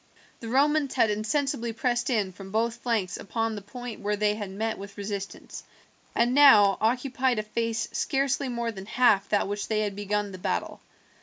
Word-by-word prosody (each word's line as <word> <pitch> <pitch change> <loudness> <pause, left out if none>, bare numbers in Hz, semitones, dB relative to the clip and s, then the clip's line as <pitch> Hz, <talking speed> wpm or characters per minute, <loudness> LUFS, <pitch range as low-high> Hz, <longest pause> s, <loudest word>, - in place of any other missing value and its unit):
The 230 - -7
Romans 285 +2 +2
had 220 - +3
insensibly 230 +2 -1
pressed 240 +2 0
in 210 -6 0
from 195 +1 -11
both 225 +3 0
flanks 220 -7 -1
upon 225 +2 -2
the 210 - -6
point 245 +3 -8
where 210 +1 0
they 210 0 +1
had 210 -2 -5
met 220 +3 -3
with 200 +1 -10
resistance, 200 -1 -6 0.5
and 240 +1 +2
now 220 -9 +7
occupied 250 +2 +1
a 215 - -1
face 230 +1 -2
scarcely 275 -1 0
more 235 -1 -2
than 195 -2 -9
half 215 -5 +3
that 205 - +1
with 205 +1 -3
which - - -4
they 215 -1 0
had 205 -2 -2
begun 205 0 -2
the 185 - -9
battle. - - -3
220 Hz, 185 wpm, -27 LUFS, 205-245 Hz, 0.5 s, now